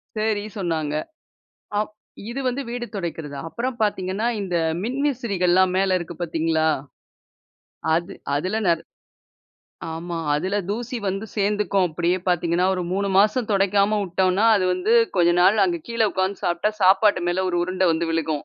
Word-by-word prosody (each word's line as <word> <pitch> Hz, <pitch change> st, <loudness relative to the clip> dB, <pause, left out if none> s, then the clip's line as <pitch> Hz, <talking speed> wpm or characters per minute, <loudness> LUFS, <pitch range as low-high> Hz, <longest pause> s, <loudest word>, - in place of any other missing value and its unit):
சரி, 215 Hz, -1 st, 0 dB
சொன்னாங்க. 160 Hz, -6 st, -2 dB, 0.8 s
அப் 210 Hz, 0 st, -1 dB, 0.4 s
இது 260 Hz, -, -4 dB
வந்து 255 Hz, +2 st, -1 dB
வீடு 240 Hz, 0 st, -4 dB
துடைக்கிறது. 165 Hz, -6 st, -5 dB
அப்புறம் 240 Hz, +8 st, -3 dB
பார்த்தீங்கன்னா, 200 Hz, +1 st, 0 dB
இந்த 180 Hz, -3 st, -1 dB, 0.3 s
மின்விசிறிகள்லாம் 205 Hz, -9 st, +1 dB
மேல 190 Hz, -1 st, +2 dB
இருக்கு 170 Hz, 0 st, -7 dB
பார்த்தீங்களா? 160 Hz, -1 st, +1 dB, 1.3 s
அது 175 Hz, +4 st, -2 dB, 0.2 s
அதுல 185 Hz, +9 st, -1 dB
நெ 170 Hz, -, +6 dB, 1.2 s
ஆமா, 170 Hz, +1 st, -5 dB, 0.2 s
அதில 185 Hz, +7 st, 0 dB
தூசி 240 Hz, +4 st, -3 dB
வந்து 195 Hz, +3 st, -3 dB
சேர்ந்துக்கும் 205 Hz, -2 st, +1 dB
அப்டியே 175 Hz, +3 st, 0 dB
பார்த்தீங்கன்னா, 175 Hz, 0 st, +1 dB
ஒரு 180 Hz, -, -2 dB
3 200 Hz, +1 st, 0 dB
மாசம் 215 Hz, +3 st, +3 dB
துடைக்காம 200 Hz, +2 st, +2 dB
விட்டோம்னா, 185 Hz, +2 st, +1 dB
அது 190 Hz, -, 0 dB
வந்து 185 Hz, +5 st, 0 dB, 0.2 s
கொஞ்ச 175 Hz, -1 st, +4 dB
நாள் 200 Hz, +3 st, +5 dB
அங்க 175 Hz, -2 st, 0 dB
கீழ 230 Hz, 0 st, -4 dB
உட்கார்ந்து 190 Hz, +1 st, -1 dB
சாப்பிட்டா, 175 Hz, +4 st, +1 dB
சாப்பாட்டு 190 Hz, 0 st, +4 dB
மேல 185 Hz, +2 st, 0 dB
ஒரு 175 Hz, -, -1 dB
உருண்டை 185 Hz, 0 st, +1 dB
வந்து 165 Hz, +1 st, -1 dB
விழுகும். 160 Hz, -2 st, -1 dB
185 Hz, 140 wpm, -23 LUFS, 175-210 Hz, 1.3 s, நெ